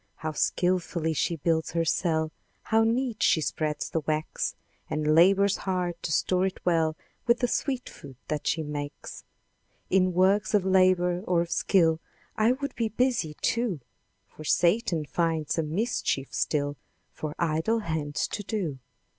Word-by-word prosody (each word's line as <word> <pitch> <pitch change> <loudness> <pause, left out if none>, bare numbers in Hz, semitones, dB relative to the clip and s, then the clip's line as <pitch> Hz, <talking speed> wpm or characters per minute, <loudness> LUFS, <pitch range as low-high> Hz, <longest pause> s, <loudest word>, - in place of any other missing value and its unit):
How 155 - -4
skilfully 170 +1 0
she 170 +2 0
builds 160 +1 0
her 165 -1 +1
cell! 160 -1 0 0.3
How 225 0 +3
neat 235 0 0
she - - +4
spreads 150 -1 -2
the 160 - -1
wax! 155 0 -2 0.3
And 150 0 +1
labours 195 +4 +5
hard 180 -3 -2
to 160 - -3
store 185 +4 +2
it 190 - -6
well 165 -3 +2 0.3
With 235 0 +5
the 245 - +1
sweet 255 0 -1
food 135 -3 -12 0.3
she 160 - 0
makes. 145 -1 -6 0.7
In 185 -1 +3
works 195 +4 +3
of 195 -2 +2
labour 185 -2 +3
or 175 -2 +3
of 170 0 -4
skill, 165 -4 +3 0.4
I 220 +2 +3
would 280 +2 -4
be 230 -2 0
busy, 220 -9 0
too; 230 -9 0 0.5
For 155 - -13
Satan 170 0 +2
finds 160 -1 0
some 160 -1 -2
mischief 205 - -1
still 145 -1 0 0.4
For 155 -1 -5
idle 170 +8 +1
hands 155 -5 -2
to 205 - -4
do. 185 - -3
170 Hz, 150 wpm, -27 LUFS, 155-200 Hz, 0.7 s, labours